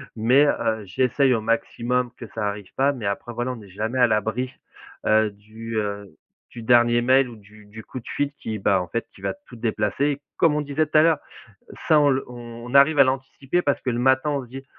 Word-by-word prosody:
mais 125 +6 +4
heu, 110 -6 0
j'essaye 130 +6 +2
au 115 - 0
maximum 120 +2 -1
que 115 - -9
ça 105 -2 -1
arrive 100 -2 -6
pas, 140 +2 +2
mais 115 -7 -5
après, 100 +4 -4
voilà, 120 +2 -2
on 115 - -10
est 100 - -14
jamais 110 +6 -3
à 125 - +6
l'abri, 110 +4 -1 0.5
heu, 110 0 +3
du, 110 +2 -8
heu, 100 -2 -4 0.3
du 120 - -10
dernier 120 0 +4
mail 130 +1 +3
ou 115 - -10
du 105 0 -17
du 110 +2 -11
coup 130 - -8
de - - -17
fil, 145 0 -1
qui, 110 -1 -5
bah, 95 -1 +2
en 90 - -6
fait 115 +7 -3
qui - - -17
va - - -2
tout 125 - -12
déplacer. 120 +6 -1 0.2
Comme 160 -3 +3
on 150 - 0
disait 145 +2 0
tout 155 - +1
à - - +8
l'heure, 160 -2 +3 0.7
ça 155 -2 +6
on 145 - +4
le 135 0 0
on 120 +1 -9
arrive 140 +2 +6
à 140 - +8
l'anticiper 135 +5 -2
parce 145 - 0
que 125 - -1
le 120 - -2
matin, 130 +3 +3
on 140 -2 -2
se 120 - -17
dit: 135 +2 -9
120 Hz, 230 wpm, -23 LUFS, 110-135 Hz, 0.7 s, à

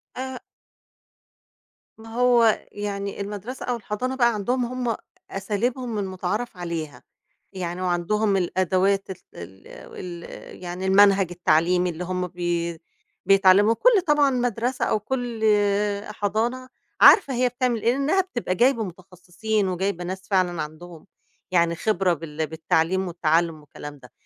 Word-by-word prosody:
آآ 260 0 -5 1.6
ما 225 0 -13
هو 240 -3 +4
يعني 200 -1 -4
المدرسة 210 +5 -6
أو 245 - -1
الحضانة 235 +4 -4
بقى 240 -2 +3
عندهم 245 +5 -1
هم 245 -2 -2 0.4
أساليبهم 225 +4 -2
المتعارف 195 +3 -3
عليها. 160 -7 -5 0.5
يعني 180 -1 -4
وعندهم 195 +3 +1
الأدوات 190 +2 +1
ال 190 - -4 0.2
ال 95 +3 -11
ال 175 -2 -9 0.4
يعني 180 +1 -5
المنهج 195 -1 +5
التعليمي 175 +1 +2
اللي 170 +1 -5
هم 180 0 -2
بي 170 -1 -3 0.5
بيتعلموا 195 +2 +5
كل 445 - +4
طبعًا 295 -2 +4
مدرسة 245 0 -1
أو 215 - +1
كل 240 -1 -4 0.6
حضانة 220 +5 -2 0.3
عارفة 280 -10 +7
هي 250 +1 +2
بتعمل 245 -2 -1
إيه، 235 - +3
لإنها 280 +9 +2
بتبقى 240 - -3
جايبة 240 +1 +3
متخصصين 185 +3 -3
وجايبة 185 0 -2
ناس 185 +2 -6
فعلًا 180 -4 +1
عندهم، 160 +3 -9 0.4
يعني 170 -2 +2
خبرة 185 -1 +1
بال 160 -1 -4
بالتعليم 165 +4 0
والتعلم 165 -1 +1
والكلام 145 0 -10
ده، 125 - -16
195 Hz, 125 wpm, -24 LUFS, 175-235 Hz, 1.6 s, عارفة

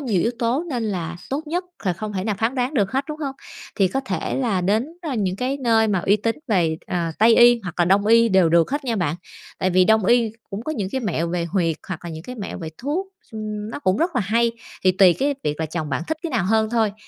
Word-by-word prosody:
nhiều 215 - 0
yếu 230 - +1
tố 245 +8 0
nên 245 -4 -1
là 175 -5 -3
tốt 295 +4 -3
nhất 350 +4 -2 0.2
là 185 - +2
không 210 +4 -5
thể 190 -1 -3
nào 215 -1 0
phán 225 +4 0
đoán 255 +2 -1
được 200 -6 +1
hết, 270 +2 0
đúng 305 0 -5
hông? 280 -3 -4 0.4
Thì 195 -2 +3
có 270 - -1
thể 190 -11 -3
là 230 -8 0
đến, 210 +7 +1 0.2
ơ, 300 -6 -3
những 190 -4 -1
cái 255 +5 -1
nơi 225 -4 +2
mà 200 -3 +1
uy 195 +4 +3
tín 225 +2 -1
về, 170 -7 +2
ờ, 170 -2 -1
Tây 225 +1 +6
y 240 0 +7
hoặc 180 -3 -6
là 175 - +4
Đông 195 +3 +3
y 230 +1 +5
đều 190 -4 +4
được 165 0 +3
hết 285 +1 -2
nha 235 -3 -1
bạn, 170 -5 -1 0.4
tại 185 - +1
vì 185 +1 +4
Đông 220 0 +3
y 235 -1 +3 0.2
cũng 200 +2 -5
có 310 - -3
những 205 -10 -3
cái 265 - -1
mẹo 170 -7 -1
về 175 0 -1
huyệt 170 -2 0
hoặc 185 -4 -4
là 170 - -5
những 160 0 -7
cái 250 - -8
mẹo 210 -5 -6
về 165 -3 -5
thuốc, 305 +9 -2 0.3
ừm, 215 -1 -5
nó - - -5
cũng 185 -9 +1
rất 335 +4 0
là 250 - +2
hay, 230 +3 +1 0.3
thì 185 - +5
tùy 185 -1 +6
cái 285 +1 +1
việc 150 +1 -2
là 160 - 0
chồng 155 -1 -4
bạn 145 - -2
thích 315 - -1
cái 335 - -3
nào 230 -9 0
hơn 220 +2 +2
thôi. 225 -3 +1
215 Hz, 275 wpm, -22 LUFS, 185-245 Hz, 0.4 s, y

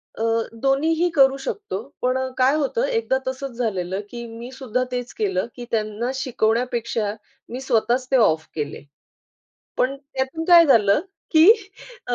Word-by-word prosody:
अ, 225 - -4 0.4
दोन्हीही 320 +6 +2
करू 270 -1 +5
शकतो. 275 - -4 0.2
पण 255 +1 +1 0.2
काय 260 +2 +4
होतं 310 - 0
एकदा 455 - 0
तसंच 265 +1 -4
झालेलं 190 -6 -2
की 235 +1 -7
मी 230 +2 -9
सुद्धा 255 -2 -2
तेच 245 -1 -4
केलं 190 -1 -1
की 245 - -8
त्यांना 220 +2 -1
शिकवण्यापेक्षा 235 -3 -1 0.4
मी 250 +2 -5
स्वतःच 250 0 +1
ते - - +4
ऑफ 160 -9 +2
केले. 150 -3 -4 0.9
पण 265 +2 +1
त्यातून 275 +3 -4
काय 345 -1 +8
झालं 210 -6 +4 0.3
की 320 0 +6 0.6
अ, 245 - 0
250 Hz, 145 wpm, -22 LUFS, 225-275 Hz, 0.9 s, काय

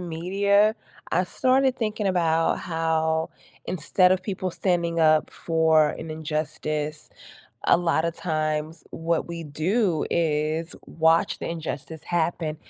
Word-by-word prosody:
media, 200 +5 +2 0.4
I 180 - +3
started 260 +6 +2
thinking 215 -2 -2
about 165 -3 +1
how 160 -1 -1 0.3
instead 180 +2 +2
of 185 0 +2
people 185 -2 -3
standing 170 -2 0
up 155 -1 +4
for 160 -2 +2
an 160 - -7
injustice, 155 -1 -3 0.6
a - - +6
lotta 170 -1 0
times 155 -1 -2
what 165 0 -1
we 170 -1 -6
do 165 +4 0
is 160 0 0
watch 160 0 +2
the - - -4
injustice 160 -1 -6
happen, 165 -2 -1
165 Hz, 120 wpm, -25 LUFS, 155-180 Hz, 0.6 s, a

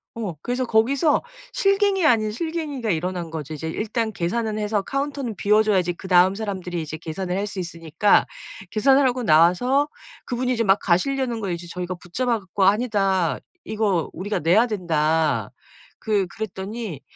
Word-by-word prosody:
어 210 -7 -4
그래서 250 +1 -1
거기서 265 +7 +2 0.3
실갱이 395 -2 +2
아닌 215 -6 +3
실갱이가 295 -4 -3
일어난 175 0 -3
거죠. 155 -1 -5
이제 160 +2 -5
일단 220 +5 -2
계산은 215 +5 -2
해서 210 -1 0
카운터는 275 -3 -3
비워 210 +3 +3
줘야지 185 -5 +1
그다음 185 +1 +3
사람들이 190 -5 -4
이제 155 +1 -6
계산을 180 +3 -4
할 200 - -1
수 190 - -5
있으니까 170 +3 +2 0.5
계산을 265 +5 +4
하고 250 0 -1
나와서 180 - +4 0.4
그분이 250 0 -1
이제 230 - 0
막 195 -1 +4
가시려는 240 +6 0
걸 195 -3 -2
이제 170 0 -6
저희가 180 +1 -4
붙잡아 230 +7 -2
가지고. 190 0 -2
"아니다. 195 - +2 0.3
이거 205 -6 0
우리가 205 +4 -3
내야 180 +10 +4
된다." 160 -6 0 0.5
그 210 -3 +1
그랬더니 200 - -6
205 Hz, 365 characters per minute, -23 LUFS, 175-240 Hz, 0.5 s, 계산을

